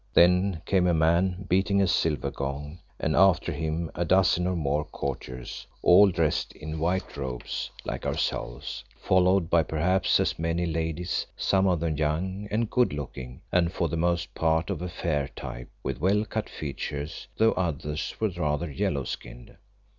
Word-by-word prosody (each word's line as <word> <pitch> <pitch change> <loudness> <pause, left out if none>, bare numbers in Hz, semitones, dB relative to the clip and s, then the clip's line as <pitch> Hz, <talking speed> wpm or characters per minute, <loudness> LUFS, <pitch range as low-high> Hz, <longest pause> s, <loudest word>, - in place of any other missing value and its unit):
Then 90 0 +4
came 95 -2 +3
a 85 - +3
man 90 +4 +2
beating 95 +2 +2
a 100 - +4
silver 80 -5 +1
gong, 70 +4 -5 0.2
and 80 - 0
after 95 -2 +4
him 80 0 -2
a 85 - -1
dozen 90 0 +3
or 90 - 0
more 75 -2 0
courtiers, 65 -3 -6 0.2
all 100 +3 +7
dressed 85 -4 0
in 80 +1 -6
white 90 +4 -1
robes 65 -3 -4 0.2
like - - -4
ourselves, - - -3 0.2
followed 95 -1 +3
by 85 - +5
perhaps 80 +5 +2
as - - 0
many 85 +1 0
ladies, 80 +1 -2
some 95 0 +2
of 90 -3 +2
them 80 -3 -1
young 90 +7 -1
and 110 +1 -1
good 125 - +3
looking, 65 -3 -7
and 85 -1 +3
for 85 -3 -1
the 85 - -2
most 85 +1 0
part 80 +3 +1
of 90 -4 -3
a 90 - -3
fair 75 -5 -1
type, 60 -1 -7
with - - -3
well 100 +4 +3
cut 110 0 -3
features, 75 +1 -5
though 110 0 +5
others 75 -3 -2
were 110 - +2
rather 80 -2 -2
yellow 70 - -1
skinned. - - -8
85 Hz, 165 wpm, -27 LUFS, 75-90 Hz, 0.2 s, all